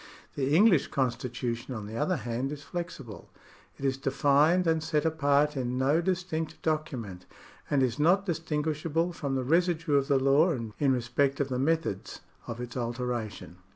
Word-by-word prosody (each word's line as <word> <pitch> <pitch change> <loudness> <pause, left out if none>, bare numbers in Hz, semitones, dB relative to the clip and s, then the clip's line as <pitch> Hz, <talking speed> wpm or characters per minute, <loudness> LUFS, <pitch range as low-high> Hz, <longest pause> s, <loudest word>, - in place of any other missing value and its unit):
The 140 +1 0
English 190 -4 +5
constitution 120 -1 -2
on 110 -2 -5
the 110 +2 -8
other 150 +9 +1
hand 120 +1 -3
is 145 -1 -7
flexible; 145 - -7 0.5
it 140 - -5
is 135 -1 +1
defined 145 +6 +3
and 160 -1 +2
set 155 0 0
apart 150 -2 +2
in 125 -1 -2
no 140 +5 +2
distinct 175 -3 -2
document, 130 - -3 0.4
and 140 -2 +3
is 125 -1 -1
not 180 +6 +4
distinguishable 160 0 -1
from 140 -5 -3
the 130 - -1
residue 165 0 +2
of 135 -1 +1
the 140 - +3
law 140 +6 +4 0.3
in 140 -2 +3
respect 130 +3 0
of 140 -1 0
the 125 -1 -2
methods 155 - -1 0.3
of 115 0 -5
its 125 -1 -6
alteration. 120 -7 -4
140 Hz, 160 wpm, -28 LUFS, 125-160 Hz, 0.5 s, English